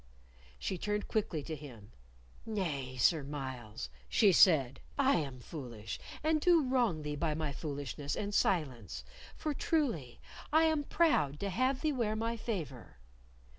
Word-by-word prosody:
She 180 - -3
turned 210 +1 -1
quickly 185 -8 -1
to 160 +2 -4
him: 125 -8 -11 0.5
"Nay, 150 - -3
Sir 155 +6 +4
Myles," 130 - -5 0.2
she 205 -3 +5
said, 145 -8 +5 0.2
"I 275 -1 +4
am 135 -5 -3
foolish, 120 -5 -7 0.2
and 310 0 +2
do 340 -2 +5
wrong 240 - +1
thee 150 0 -3
by 155 0 0
my 155 -2 -2
foolishness 145 0 -4
and 205 0 -3
silence, 125 - 0 0.3
for, 305 - -2
truly, 245 - -1 0.3
I 315 +2 +5
am 315 -2 +2
proud 150 - +2
to 200 -1 -1
have 255 +6 +1
thee 310 -2 +1
wear 225 -5 0
my 230 +1 -1
favor." 160 - -5
160 Hz, 145 wpm, -33 LUFS, -, 0.5 s, she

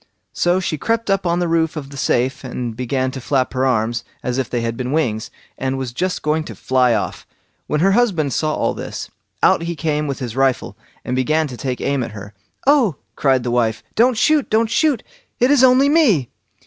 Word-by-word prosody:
So 175 +1 +2
she 160 -5 -2
crept 230 +1 0
up 195 -2 +1
on 170 0 +1
the 175 0 0
roof 165 -1 +1
of 140 -2 -6
the - - -9
safe 130 -1 0
and 125 -3 -4
began 130 +2 -1
to 130 - -7
flap 130 0 0
her 130 0 +1
arms, 115 -1 0 0.2
as 125 0 -1
if 130 - -2
they 120 - -1
had 115 0 -2
been 125 +2 -3
wings, 120 -9 -1 0.3
and 135 0 -1
was 130 -3 -4
just 180 +7 -2
going 155 +1 +1
to - - -8
fly 125 -2 +2
off. 105 - -4 0.4
When 150 - 0
her 195 +2 +4
husband 190 - +2
saw 155 +3 0
all - - 0
this, - - -6 0.3
out - - +5
he 170 0 -3
came 150 -1 -1
with 140 -1 -3
his 120 -3 -5
rifle, 135 -6 0 0.3
and 125 - -2
began 155 +5 +1
to 125 - -7
take 125 +2 -4
aim 140 -1 0
at 115 - -5
her. 100 0 -9 0.3
"Oh!" 265 - +4 0.2
cried 130 -3 +2
his - - 0
wife, 115 -2 0
"don't 240 +1 +3
shoot, 300 +3 +3
don't 220 +1 +2
shoot! 280 -2 +2 0.4
it 250 +3 +4
is 280 -3 +5
only 260 +2 +6
me." 250 - +3
140 Hz, 215 wpm, -19 LUFS, 125-185 Hz, 0.4 s, only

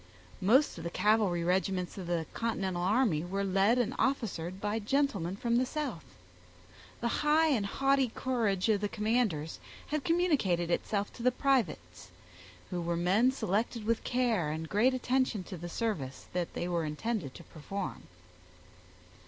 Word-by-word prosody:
Most 235 - +4
of - - -7
the 170 - -2
cavalry 205 -3 +2
regiments 185 0 0
of 185 -3 -6
the 170 -2 -1
continental 195 -6 -2
army 195 -4 +2
were 195 +3 -2
led 195 +5 +3
and 245 -1 +1
officered 195 -9 -1
by 210 +2 -1
gentlemen 210 - 0
from 235 +3 +1
the 255 - +3
South. 300 +1 -4 1.0
The 235 - +1
high 310 +2 +4
and 220 -9 +1
haughty 270 +2 +2
courage 225 -7 0
of 210 -3 +2
the 205 - -1
commanders 210 -9 0 0.3
had 300 -1 -1
communicated 255 - +1
itself 205 +3 -1
to - - -10
the 250 +2 +4
privates, 155 - -1 0.6
who 180 -1 -2
were 170 0 -1
men 195 +8 +3
selected 225 -1 -1
with 230 0 0
care 235 -10 +1
and 160 +1 -4
great 235 +8 +3
attention 255 -5 0
to 185 - -8
the 175 +1 -7
service 165 - -3
they 175 0 -2
were 170 -2 0
intended 155 - -3
to 170 - -10
perform. 190 +6 -6
205 Hz, 155 wpm, -31 LUFS, 175-245 Hz, 1.0 s, Most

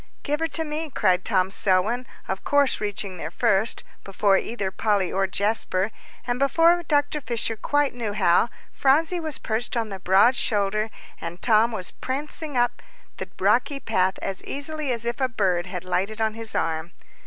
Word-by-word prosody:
"Give 295 +1 -1
her 325 - 0
to 325 +1 -2
me," 310 +1 -4
cried 185 -8 +2
Tom 190 -3 +1
Selwyn, 210 +7 +1 0.2
of 190 - -3
course 285 -4 +2
reaching 200 -2 -3
there 160 - -5
first, 215 +3 +1 0.2
before 195 0 +2
either 195 -1 -2
Polly 200 -2 +1
or 195 0 +1
Jasper; 200 0 0 0.3
and 245 0 -1
before 330 +5 +4
Dr. 295 -1 0
Fisher 230 -3 -2
quite 290 +6 +1
knew 230 -4 -3
how, 200 +2 +3 0.2
Phronsie 320 +6 +2
was 315 -3 -3
perched 235 +2 -2
on 225 -2 -1
the 195 -1 -6
broad 195 +7 +5
shoulder, 215 -1 0 0.3
and 170 +1 -6
Tom 225 +1 +4
was 200 -5 -4
prancing 290 +1 -4
up 240 0 +1 0.4
the - - -6
rocky 285 -2 +2
path 190 -6 +1
as 195 -1 -2
easily 290 0 -3
as 235 -1 -3
if 235 +3 -3
a 260 - +2
bird 185 -7 0
had 180 -1 -5
lighted 185 +4 -1
on 220 -1 +1
his 225 0 -4
arm. 165 +1 -1
220 Hz, 175 wpm, -24 LUFS, 190-270 Hz, 0.4 s, broad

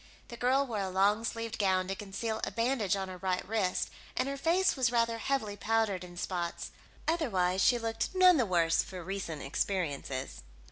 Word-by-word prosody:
The 235 - -7
girl 255 +3 +2
wore 225 -5 -3
a 195 -1 -1
long 200 +4 +2
sleeved 230 0 -3
gown 185 -2 +2
to 195 - -1
conceal 210 +3 -4
a - - 0
bandage 230 -4 +1
on 195 -1 -3
her 185 -1 -8
right 185 -1 -1
wrist, 200 -4 0 0.3
and 255 - +1
her 275 - -2
face 345 +7 +2
was 255 -3 +2
rather 230 -1 +1
heavily 225 -6 -1
powdered 215 -3 0
in 175 -1 -11
spots; 175 -2 -3 0.4
otherwise 195 - +1
she 245 - +5
looked 225 +7 -3
none 365 -2 +7
the 245 -5 +2
worse 170 -3 +3
for 185 -2 -8
recent 180 -5 -4
experiences. 140 - -2
205 Hz, 185 wpm, -31 LUFS, 185-235 Hz, 0.4 s, none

